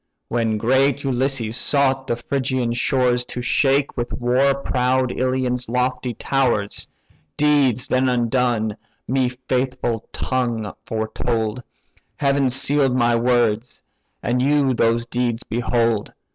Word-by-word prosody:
"When 115 -2 0
great 130 +5 +2
Ulysses 130 -3 -1
sought 135 -2 +1
the 120 - 0
Phrygian 130 -1 -2
shores 125 0 +1
To 125 - -6
shake 135 +3 +2
with 120 -1 -3
war 130 +3 +2
proud 130 -1 0
Ilion's 130 -1 -1
lofty 125 0 -1
towers, 120 -7 0 0.5
Deeds 140 -5 +3
then 130 0 +2
undone 120 -3 0 0.3
my 130 -1 +1 0.2
faithful 125 -3 -1
tongue 120 -5 -2
foretold: 110 +1 -2 0.5
Heaven 140 -2 +1
seal'd 135 0 +3
my 120 -2 +3
words, 120 -1 +1 0.4
and 125 +2 0
you 140 -1 +2
those 115 0 +1
deeds 120 0 -2
behold. 115 -1 0
125 Hz, 115 wpm, -21 LUFS, 120-130 Hz, 0.5 s, Deeds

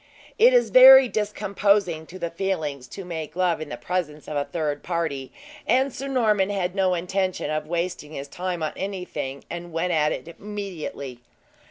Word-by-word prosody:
It 480 +3 +7
is - - +3
very 265 +1 +10
discomposing 200 -5 0
to 185 - -10
the 170 -2 -4
feelings 160 -8 -3
to 195 - -8
make 160 -3 -6
love 180 -3 +1
in 155 - -6
the - - -5
presence 160 -5 -3
of 150 - -5
a 145 0 0
third 150 -3 -3
party; 160 -6 -3 0.4
and 265 +1 +2
Sir 275 - -5
Norman 215 -7 +2
had 185 -3 -1
no 190 -2 +2
intention 185 0 -2
of 155 0 -2
wasting 170 -2 -3
his 140 -1 -6
time 180 +2 -4
on 155 - -2
anything, 180 -8 -5
and 175 0 -7
went 170 +2 -1
at 150 -1 +2
it - - -5
immediately. 185 - -6
180 Hz, 175 wpm, -24 LUFS, 155-200 Hz, 0.4 s, very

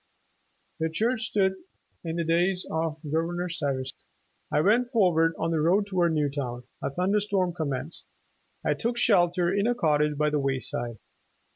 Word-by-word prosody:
The 160 0 0
church 225 +7 0
stood 190 -2 +2 0.5
in 165 -1 -3
the 170 - 0
days 175 +3 +1
of 160 -1 -1
Govern 165 +3 -1
or 180 0 -2
Stuyvesant. 140 -5 -2 0.6
''I 150 - +2
went 240 +5 +3
forward 170 -8 +3
on 165 - -1
the 160 - +1
road 185 +6 +3
toward 180 -4 +1
Newtown. 140 -5 -2 0.2
A - - -1
thunder 185 +8 +1
storm 195 -3 0
commenced. 155 -1 -4 0.6
I - - +3
took 235 +1 -2
shelter 175 -5 +3
in 200 +2 +1
a 245 - +2
cottage 150 -6 +1
by 150 0 +2
the 150 - +1
wayside. 130 -4 -2
170 Hz, 160 wpm, -27 LUFS, 150-190 Hz, 0.6 s, went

